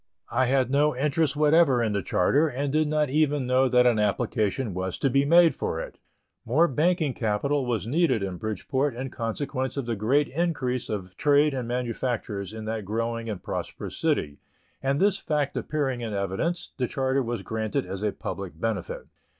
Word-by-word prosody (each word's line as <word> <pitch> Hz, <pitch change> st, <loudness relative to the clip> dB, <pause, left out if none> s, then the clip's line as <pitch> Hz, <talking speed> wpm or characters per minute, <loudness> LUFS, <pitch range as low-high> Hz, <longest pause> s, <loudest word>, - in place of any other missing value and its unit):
I 130 Hz, +2 st, +2 dB
had 130 Hz, 0 st, +2 dB
no 150 Hz, +1 st, +3 dB
interest 150 Hz, +2 st, +1 dB
whatever 150 Hz, -4 st, +4 dB
in 110 Hz, -2 st, 0 dB
the 100 Hz, -, 0 dB
charter, 140 Hz, -, +2 dB
and 140 Hz, 0 st, -2 dB
did 155 Hz, 0 st, +2 dB
not 150 Hz, -2 st, +1 dB
even 150 Hz, -2 st, +2 dB
know 130 Hz, +1 st, +3 dB
that 125 Hz, 0 st, +4 dB
an 120 Hz, -3 st, +4 dB
application 105 Hz, +1 st, 0 dB
was 95 Hz, 0 st, -3 dB
to 135 Hz, -, +1 dB
be 140 Hz, +2 st, +3 dB
made 170 Hz, +2 st, +6 dB
for 80 Hz, -, -3 dB
it. -, -, -7 dB, 0.4 s
More 150 Hz, +9 st, +3 dB
banking 155 Hz, 0 st, +1 dB
capital 125 Hz, +6 st, 0 dB
was 110 Hz, -6 st, -1 dB
needed 130 Hz, -, +2 dB
in 95 Hz, -2 st, -4 dB
Bridgeport 115 Hz, +7 st, -2 dB
in 130 Hz, +1 st, -5 dB
consequence 130 Hz, +3 st, -3 dB
of 140 Hz, -, -2 dB
the 115 Hz, -1 st, -1 dB
great 130 Hz, +8 st, +2 dB
increase 135 Hz, -6 st, -1 dB
of 95 Hz, -4 st, -5 dB
trade 145 Hz, 0 st, +4 dB
and 125 Hz, -3 st, -3 dB
manufactures 120 Hz, -5 st, -3 dB
in 110 Hz, 0 st, -7 dB
that 110 Hz, -1 st, -3 dB
growing 115 Hz, +3 st, -2 dB
and 100 Hz, -4 st, -5 dB
prosperous -, -, -5 dB
city, 70 Hz, -1 st, -1 dB, 0.4 s
and 135 Hz, +1 st, 0 dB
this 200 Hz, 0 st, +3 dB
fact 150 Hz, -5 st, -1 dB
appearing 135 Hz, -5 st, -1 dB
in 110 Hz, -3 st, -3 dB
evidence, 100 Hz, -, -2 dB
the 125 Hz, -, 0 dB
charter 135 Hz, +1 st, 0 dB
was 120 Hz, -4 st, -3 dB
granted 110 Hz, -3 st, -2 dB
as 95 Hz, +1 st, -6 dB
a 105 Hz, -1 st, +1 dB
public 95 Hz, -5 st, -6 dB
benefit. 100 Hz, -6 st, -3 dB
125 Hz, 180 wpm, -26 LUFS, 110-145 Hz, 0.4 s, made